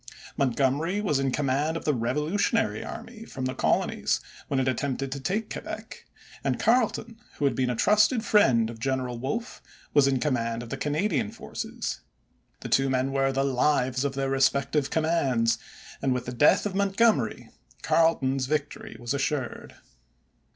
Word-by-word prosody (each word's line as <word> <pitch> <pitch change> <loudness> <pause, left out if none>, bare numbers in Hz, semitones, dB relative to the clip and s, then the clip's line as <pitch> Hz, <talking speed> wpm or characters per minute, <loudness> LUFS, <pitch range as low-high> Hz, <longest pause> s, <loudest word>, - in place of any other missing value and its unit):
Montgomery 140 - +1
was 170 -10 +1
in 135 0 +1
command 145 +4 0
of - - -8
the 150 - +2
Revolutionary 150 - 0
Army 225 -2 -8
from 130 -11 -6
the 130 - -1
Colonies, - - +1 0.3
when 135 - 0
it 130 - 0
attempted 135 +1 -1
to 140 - -3
take 205 +10 -2
Quebec, - - -7 0.4
and - - 0
Carleton, 230 -1 +1 0.2
who 145 - 0
had 140 - +3
been 130 -1 0
a 125 - -1
trusted 215 - +3
friend 120 - +4
of 115 - -11
General 125 -1 -2
Wolfe, 185 - -4 0.3
was 145 -2 +5
in 135 -2 +2
command 120 -4 -1
of 120 - -10
the - - -1
Canadian 150 - 0
forces. - - -5 0.6
The - - -5
two 135 0 +3
men 130 +1 0
were 135 0 +1
the 135 0 0
lives 130 -1 +1
of 140 -1 -2
their 135 0 -1
respective 135 +1 +2
commands, 135 -8 +1 0.4
and 135 -2 +1
with 125 0 -3
the 125 - -5
death 150 - +4
of 205 - -2
Montgomery 200 +3 +1 0.3
Carleton's 135 -5 +2
victory 150 0 -3
was 120 +1 -3
assured. 140 -2 -3
135 Hz, 160 wpm, -27 LUFS, 130-160 Hz, 0.6 s, was